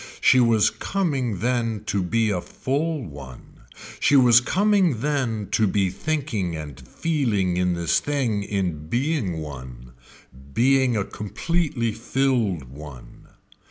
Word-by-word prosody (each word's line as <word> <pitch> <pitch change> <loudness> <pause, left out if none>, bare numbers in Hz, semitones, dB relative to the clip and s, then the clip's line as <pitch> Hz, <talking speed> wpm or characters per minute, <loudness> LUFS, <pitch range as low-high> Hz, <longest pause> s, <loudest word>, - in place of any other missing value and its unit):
She 130 - +5
was 115 -3 +4
coming 135 - -2
then 115 -3 -1
to 100 - 0
be 110 +4 +1
a 90 -3 -1
full 145 - -2
one, 70 -6 -12 0.4
she 145 - +3
was 125 -3 +7
coming 185 - +2
then 125 -8 -1
to 110 0 +3
be 95 -2 +1
thinking 110 - -2
and 75 -4 -7
feeling 115 - -1
in 90 0 +1
this 85 -1 +1
thing 130 -8 -1
in 90 -7 -3
being 125 - -1
one 65 -5 -8 0.6
being 130 -1 +3
a 100 - -1
completely 140 - -2
filled 115 - 0
one. 65 -2 -12
110 Hz, 125 wpm, -23 LUFS, 90-135 Hz, 0.6 s, was